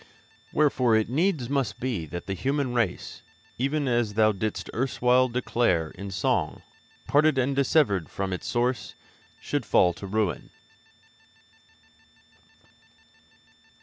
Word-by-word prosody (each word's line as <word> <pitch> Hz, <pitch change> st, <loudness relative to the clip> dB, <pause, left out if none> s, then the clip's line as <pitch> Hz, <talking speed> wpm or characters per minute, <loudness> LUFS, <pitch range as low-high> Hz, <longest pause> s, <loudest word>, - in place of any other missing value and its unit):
Wherefore 130 Hz, -6 st, +3 dB
it 110 Hz, +1 st, +1 dB
needs 155 Hz, -3 st, +1 dB
must 135 Hz, -5 st, -1 dB
be 115 Hz, -11 st, -3 dB
that 85 Hz, +4 st, -7 dB
the 95 Hz, -, -3 dB
human 135 Hz, +4 st, -1 dB
race, 115 Hz, -7 st, -2 dB, 0.4 s
even 140 Hz, +2 st, 0 dB
as 120 Hz, -4 st, 0 dB
thou 110 Hz, 0 st, +4 dB
didst 105 Hz, +1 st, -3 dB
erstwhile 125 Hz, 0 st, +2 dB
declare 115 Hz, -9 st, 0 dB
in 100 Hz, +2 st, -8 dB
song, 95 Hz, 0 st, -1 dB, 0.4 s
parted 150 Hz, 0 st, +3 dB
and 130 Hz, +2 st, +1 dB
dissevered 135 Hz, -, +2 dB
from 95 Hz, -1 st, -3 dB
its 90 Hz, -, -5 dB
Source, 120 Hz, -4 st, -1 dB, 0.4 s
should -, -, -2 dB
fall 90 Hz, -, +3 dB
to 100 Hz, +4 st, -9 dB
ruin.' 100 Hz, -6 st, -1 dB
120 Hz, 115 wpm, -26 LUFS, 100-135 Hz, 0.4 s, thou